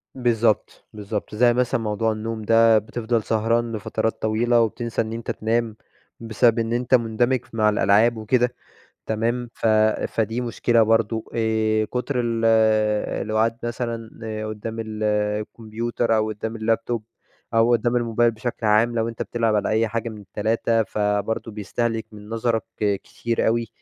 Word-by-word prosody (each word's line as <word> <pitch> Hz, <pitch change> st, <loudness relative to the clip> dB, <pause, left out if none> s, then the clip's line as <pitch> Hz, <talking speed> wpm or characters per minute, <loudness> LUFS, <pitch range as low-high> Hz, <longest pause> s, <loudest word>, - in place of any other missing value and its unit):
بالضبط، 115 Hz, -4 st, 0 dB
بالضبط، 105 Hz, 0 st, -5 dB
زي 120 Hz, +2 st, +4 dB
مثلًا 125 Hz, 0 st, 0 dB
موضوع 110 Hz, +1 st, 0 dB
النوم 110 Hz, +1 st, -4 dB
ده 115 Hz, +1 st, +5 dB
بتفضل 110 Hz, +1 st, -1 dB
سهران 115 Hz, +2 st, 0 dB
لفترات 110 Hz, +1 st, -2 dB
طويلة 115 Hz, +2 st, +2 dB
وبتنسى 115 Hz, +1 st, -1 dB
إن 110 Hz, 0 st, -4 dB
أنت 115 Hz, 0 st, -4 dB
تنام 115 Hz, 0 st, -1 dB, 0.4 s
بسبب 115 Hz, +1 st, +2 dB
إن 115 Hz, 0 st, -1 dB
أنت 125 Hz, +2 st, +3 dB
مندمج 120 Hz, +2 st, +1 dB
مع 110 Hz, -1 st, +3 dB
الألعاب 105 Hz, +3 st, +3 dB
وكده 120 Hz, +3 st, +1 dB, 0.5 s
تمام، 115 Hz, +2 st, -1 dB
ف -, -, -6 dB, 0.4 s
فدي 115 Hz, +2 st, -1 dB
مشكلة 120 Hz, -1 st, +2 dB
برضو 115 Hz, 0 st, 0 dB
آآ، 110 Hz, -1 st, +1 dB
كتر 125 Hz, +5 st, -3 dB
ال 115 Hz, -1 st, 0 dB, 0.8 s
القعاد 110 Hz, +1 st, +1 dB
مثلًا 115 Hz, -1 st, -4 dB, 0.4 s
قدّام 110 Hz, +1 st, -6 dB
ال 110 Hz, -1 st, -5 dB
الكمبيوتر 110 Hz, +2 st, -1 dB
أو 110 Hz, 0 st, 0 dB
قدّام 110 Hz, +1 st, -5 dB
اللاب 115 Hz, 0 st, 0 dB
توب 120 Hz, -2 st, -2 dB, 0.5 s
أو 115 Hz, +1 st, +4 dB
قدّام 120 Hz, +1 st, +2 dB
الموبايل 120 Hz, 0 st, +2 dB
بشكل 115 Hz, 0 st, -5 dB
عام 110 Hz, +3 st, +3 dB
لو 115 Hz, -1 st, 0 dB
أنت 115 Hz, -1 st, -6 dB
بتلعب 115 Hz, -2 st, 0 dB
على 105 Hz, -, 0 dB
أي 110 Hz, +1 st, +2 dB
حاجة 115 Hz, +1 st, -3 dB
من 110 Hz, -2 st, -9 dB
ال3 110 Hz, +3 st, 0 dB
فبرضو 105 Hz, +2 st, -1 dB
بيستهلك 110 Hz, +2 st, -2 dB
من 105 Hz, 0 st, -12 dB
نظرك 115 Hz, -1 st, 0 dB, 0.2 s
كتير 105 Hz, +3 st, -1 dB
أوي 115 Hz, 0 st, +1 dB
115 Hz, 145 wpm, -23 LUFS, 110-115 Hz, 0.8 s, ده